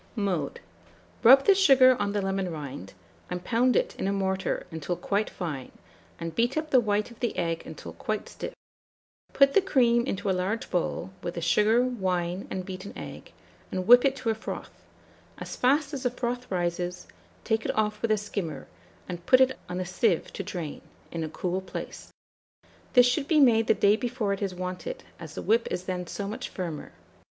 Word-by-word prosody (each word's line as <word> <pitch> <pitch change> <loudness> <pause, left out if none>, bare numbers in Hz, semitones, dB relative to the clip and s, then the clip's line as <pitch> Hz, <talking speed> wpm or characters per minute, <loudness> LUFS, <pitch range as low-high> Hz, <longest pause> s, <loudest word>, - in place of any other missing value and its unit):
] - - -30 0.2
Mode. 155 -6 -3 0.6
Rub 270 +4 +8
the 400 - +7
sugar 270 -9 +6
on 205 0 0
the 205 -1 -1
lemon 195 -1 -1
rind, 140 - -7 0.3
and 180 0 -4
pound 245 +5 +2
it - - +1
in - - -1
a - - +1
mortar 190 -1 -1
until 160 +2 -3
quite 205 +4 -1
fine, 150 -8 -5 0.5
and 165 -1 -4
beat 240 +5 +1
up 310 0 -2
the 260 - +7
white 210 0 0
of 235 - -15
the 240 - -2
egg 165 -1 -1
until - - -8
quite - - -3
stiff; - - -7 0.8
put 275 0 +5
the 400 - +6
cream 240 -10 +3
into 195 -3 -3
a - - +3
large 190 +5 -2
bowl, 180 0 -1
with 175 - -4
the 170 - -3
sugar, 210 +8 +4
wine, 185 -7 -1
and 185 -1 -4
beaten 185 +1 -7
egg, - - -9 0.4
and 185 -1 -3
whip 245 +3 +8
it 275 -1 +2
to 245 -4 -1
a - - +1
froth; 220 - -6 0.7
as - - -7
fast 285 +3 +2
as 275 - -3
the 250 - +1
froth 245 0 -4
rises, 175 0 -2 0.4
take 220 0 0
it - - -2
off 210 0 0
with 230 - 0
a 215 - +3
skimmer, 170 -9 -4 0.4
and 175 -1 -7
put 255 - +7
it 260 0 +4
on 180 - -3
a 185 - -2
sieve 185 0 0
to - - -4
drain, 165 -5 -5 0.3
in 165 -1 -3
a 155 - -3
cool 180 +3 -2
place. 190 - -7 0.8
This 245 -2 +7
should 265 +3 +1
be 315 -2 +4
made 225 -5 +5
the - - +4
day 205 +1 +4
before 235 -3 -1
it 195 - -5
is 195 -2 -2
wanted, 185 - -5 0.2
as - - -9
the - - -5
whip 230 +2 +2
is 180 - -3
then 180 -1 -4
so 200 +3 -4
much 215 - -5
firmer. 170 -5 -5
205 Hz, 200 wpm, -27 LUFS, 180-245 Hz, 0.8 s, Rub